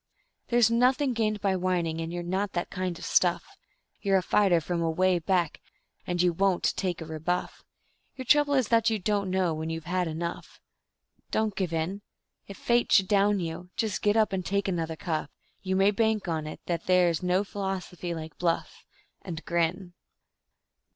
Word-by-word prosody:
There's 235 -2 +4
nothing 255 +3 +3
gained 215 -3 -1
by 195 -2 +1
whining, 175 -3 -1
and 165 0 -4
you're 175 0 -4
not 190 +3 -2
that 175 - -3
kind 185 -2 -3
of - - -8
stuff; - - +2 0.6
You're 195 -2 +3
a 185 - 0
fighter 190 -2 +3
from 170 +1 -2
away 175 +2 +2
back, 170 -1 0 0.5
and 175 0 -2
you 175 -1 +3
WON'T 190 +1 +1
take 180 -3 -2
a - - -5
rebuff; 160 +3 -3 0.5
Your 260 - -7
trouble 290 +2 +4
is 260 -5 +1
that 230 -1 +4
you 220 - 0
don't 200 0 -1
know 185 -3 +1
when 160 +1 -4
you 165 0 -3
have 160 - -21
had 180 0 0
enough 165 +2 -5 0.7
Don't 220 -2 0
give 185 -4 -2
in. 165 +5 -2 0.5
If 200 - -9
Fate 240 0 +1
should 190 - +5
down 205 0 +3
you, 170 +2 -5
just 220 -3 -1
get 210 +1 +2
up 215 -2 +3
and 185 -1 -1
take 200 +2 -1
another 165 -3 -2
cuff; 155 -3 -3 0.3
You 190 -1 -1
may 195 +2 +4
bank 220 -1 0
on 160 -2 -2
it 155 - -8
that 170 -2 -3
there 180 -1 +5
is 165 -2 -2
no 180 +2 +1
philosophy 190 -3 -4
like 160 -1 -8
bluff, 170 -2 -1 0.4
And 165 -3 -7
grin. 175 +2 -1
185 Hz, 185 wpm, -28 LUFS, 170-205 Hz, 0.7 s, should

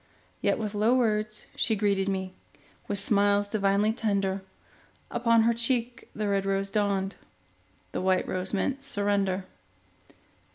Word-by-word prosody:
Yet - - +2
with 215 -2 -3
low 215 +4 +3
words 215 -3 0
she 225 - +1
greeted 200 -2 +1
me, 190 -1 -3 0.5
With 205 - -1
smiles 205 0 +3
divinely 205 +1 +2
tender; 200 -4 -1 0.7
Upon 230 -1 +3
her 235 +1 +3
cheek 235 +1 0
the 210 0 -2
red 200 -1 +1
rose 195 0 -1
dawned, 200 -1 0 0.8
The - - -3
white 185 0 +1
rose 185 0 0
meant 265 +7 -1
surrender. 200 -6 0
205 Hz, 130 wpm, -27 LUFS, 195-220 Hz, 0.8 s, low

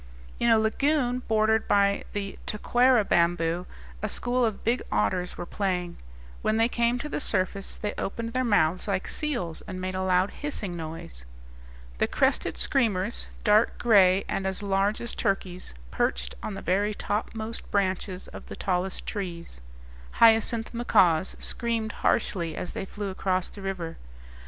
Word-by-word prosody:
In 235 - +3
a 225 - +6
lagoon 250 +3 +1
bordered 220 0 +2
by 200 0 +3
the 200 -1 -4
taquara 245 +1 +3
bamboo 170 0 +1 0.3
a - - -1
school 245 +1 0
of 220 -4 -1
big 235 +3 +1
otters 105 - 0
were - - -4
playing; 180 -3 -2 0.4
when 215 - +1
they 225 +1 +4
came 235 0 +1
to 290 - -4
the - - -3
surface, 195 -5 0
they 210 - -3
opened 230 +3 -3
their 255 0 +1
mouths 185 -6 +2
like 195 -2 -1
seals, 240 - -2
and 185 0 -5
made 185 0 -3
a 185 - -2
loud 185 +1 +2
hissing 215 -11 -4
noise. 160 - -7 0.8
The - - +3
crested - - +1
screamers, 220 -5 +1 0.2
dark 215 +1 +4
gray 195 -5 +5
and 190 - -1
as 190 +2 -4
large 200 +1 +1
as 235 - -4
turkeys, 185 - -2 0.2
perched - - -1
on 210 - -4
the 195 - -7
very 205 +3 +1
topmost 220 +2 -3
branches 190 -1 -1
of - - -10
the - - -7
tallest 185 0 -2
trees. 170 - -5 0.5
Hyacinth 225 0 +4
macaws 185 -7 +3
screamed 230 -2 -1
harshly 170 -4 +1
as - - -5
they - - -4
flew 205 0 -5
across 185 -1 -1
the 200 - -10
river. 190 -4 -4
200 Hz, 155 wpm, -27 LUFS, 185-225 Hz, 0.8 s, a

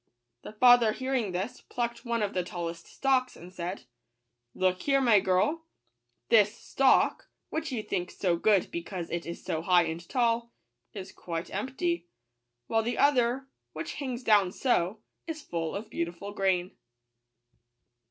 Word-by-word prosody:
The - - -9
father 245 -1 +6
hearing 260 -6 -1
this, 200 +8 -4
plucked 235 -1 -4
one 235 -2 0
of 200 - -2
the 180 - 0
tallest 170 -1 -6
stalks, 260 -2 +1
and 180 +2 -12
said: 180 -1 -5 0.4
" 120 - -53 0.3
Look 185 -1 +1
here, 275 -1 +3
my 235 -6 +5
girl: 205 - +1 0.6
this 210 -2 +5
stalk, 270 -1 +2 0.2
which 315 -2 -3
you 230 -4 -2
think 180 -3 -2
so 180 -3 0
good 200 +2 +2
because 170 0 -5
it 170 0 -3
is 170 - -7
so 160 - -2
high 175 0 +4
and 165 +1 -5
tall, 235 -1 +1 0.4
is 195 -2 -8
quite 165 0 -6
empty; 340 - -2 0.6
while 225 - +1
the 235 +2 -2
other, 265 -1 +3 0.3
which - - -5
hangs 255 -3 -4
down 205 -5 +4
so, 210 -3 0 0.3
is 315 -2 -5
full 165 -2 -3
of 215 +2 -6
beautiful 175 +3 -4
grain." 190 -2 +1
210 Hz, 150 wpm, -29 LUFS, 180-250 Hz, 0.6 s, father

